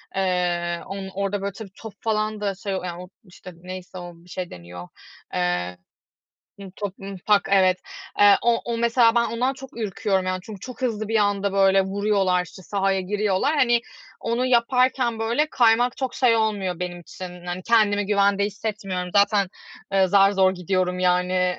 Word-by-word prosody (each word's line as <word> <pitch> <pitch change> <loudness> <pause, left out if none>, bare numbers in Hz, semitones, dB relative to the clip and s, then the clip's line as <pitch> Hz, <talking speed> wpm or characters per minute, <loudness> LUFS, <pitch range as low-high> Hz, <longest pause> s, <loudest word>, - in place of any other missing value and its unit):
Eee, 175 -2 0
on 195 0 -6
orada 200 +1 -2
böyle 200 0 -2
tabii 200 -1 -10
top 220 -3 -9
falan 215 -2 -1
da 200 -2 -1
şey, 195 0 -4
o 185 - -4
yani, 175 0 -5
o 180 - -13
işte 185 -1 -13
neyse 185 +1 -9
o, 175 -1 -7
bir 170 +2 -20
şey 180 -1 -5
deniyor, 90 0 -10 0.5
eee, 90 0 -1 0.8
ımm, 195 -2 -9
top, 205 -3 -4
ımm, 195 0 -7
pak 205 -1 +3
evet, 185 -2 +4 0.4
eee, 205 -1 +8
o 235 0 +3
o 235 -1 -2
mesela 235 0 +3
ben 235 - +3
ondan 245 +4 -1
çok 265 -2 -12
ürküyorum 195 -3 -1
yani, 185 0 -1
çünkü 210 -3 -9
çok 255 +4 -9
hızlı 220 -4 -1
bir 225 - -2
anda 200 -1 +1
böyle 195 0 +4
vuruyorlar 195 -2 +1
işte, 185 - -13
sahaya 195 0 0
giriyorlar 210 +8 0
hani, 240 -3 +3 0.4
onu 240 +2 -1
yaparken 250 -1 +2
böyle 235 +7 +1
kaymak 240 0 +3
çok 260 -2 -3
şey 245 -3 +4
olmuyor 205 -5 -1
benim 175 -1 -4
için 180 0 -10
hani, 180 +1 -4
kendimi 205 -2 +3
güvende 200 0 +2
hissetmiyorum. 200 -3 -4
Zaten, 200 -1 +4 0.4
eee, 195 -1 +3
zar 195 +1 +5
zor 190 -1 +3
gidiyorum 180 0 -1
yani, 180 0 +2
195 Hz, 175 wpm, -23 LUFS, 185-220 Hz, 0.8 s, eee